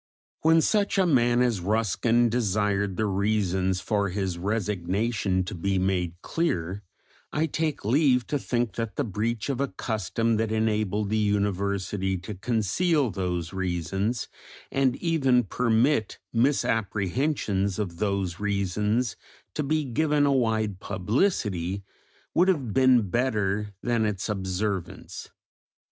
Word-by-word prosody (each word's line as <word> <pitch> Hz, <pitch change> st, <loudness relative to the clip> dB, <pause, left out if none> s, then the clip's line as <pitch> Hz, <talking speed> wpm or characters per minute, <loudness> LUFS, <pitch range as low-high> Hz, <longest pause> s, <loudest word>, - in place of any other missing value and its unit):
When 160 Hz, +1 st, +5 dB
such 200 Hz, +2 st, +1 dB
a 190 Hz, -, +4 dB
man 120 Hz, -6 st, +3 dB
as 120 Hz, -5 st, +1 dB
Ruskin 115 Hz, +4 st, +2 dB
desired 105 Hz, -4 st, 0 dB
the 110 Hz, -, +1 dB
reasons 95 Hz, -2 st, 0 dB
for 100 Hz, -1 st, 0 dB
his 95 Hz, -1 st, -2 dB
resignation 100 Hz, 0 st, -1 dB
to 95 Hz, +5 st, -6 dB
be 95 Hz, +2 st, -1 dB
made 90 Hz, -2 st, 0 dB
clear, 95 Hz, -, -1 dB, 0.5 s
I 155 Hz, -, +1 dB
take 155 Hz, -5 st, -2 dB
leave 125 Hz, 0 st, +3 dB
to 145 Hz, -, -1 dB
think 120 Hz, -4 st, -1 dB
that 115 Hz, -2 st, -3 dB
the -, -, 0 dB
breach 110 Hz, +2 st, -2 dB
of 135 Hz, -2 st, -1 dB
a 140 Hz, -, +1 dB
custom 115 Hz, 0 st, -1 dB
that 110 Hz, 0 st, 0 dB
enabled 105 Hz, -2 st, 0 dB
the 110 Hz, -, +2 dB
University 100 Hz, -1 st, 0 dB
to 90 Hz, +4 st, -7 dB
conceal 120 Hz, -, +1 dB
those 90 Hz, -3 st, -3 dB
reasons 95 Hz, +5 st, -2 dB, 0.4 s
and 135 Hz, -2 st, +2 dB
even 135 Hz, -7 st, +2 dB
permit 115 Hz, +2 st, +1 dB, 0.2 s
misapprehensions 110 Hz, -, 0 dB
of 95 Hz, -6 st, -3 dB
those 100 Hz, -3 st, -1 dB
reasons 105 Hz, +4 st, 0 dB, 0.4 s
to -, -, -1 dB
be 150 Hz, +1 st, 0 dB
given 145 Hz, +3 st, +2 dB
a 140 Hz, -, +3 dB
wide 110 Hz, -6 st, 0 dB
publicity, 100 Hz, -, -1 dB, 0.5 s
would 180 Hz, +3 st, +4 dB
have 140 Hz, -, +1 dB
been 125 Hz, -7 st, +4 dB
better 105 Hz, -4 st, 0 dB
than 120 Hz, -3 st, +1 dB
its 105 Hz, +1 st, -3 dB
observance. 95 Hz, -1 st, -3 dB
105 Hz, 125 wpm, -26 LUFS, 95-125 Hz, 0.5 s, When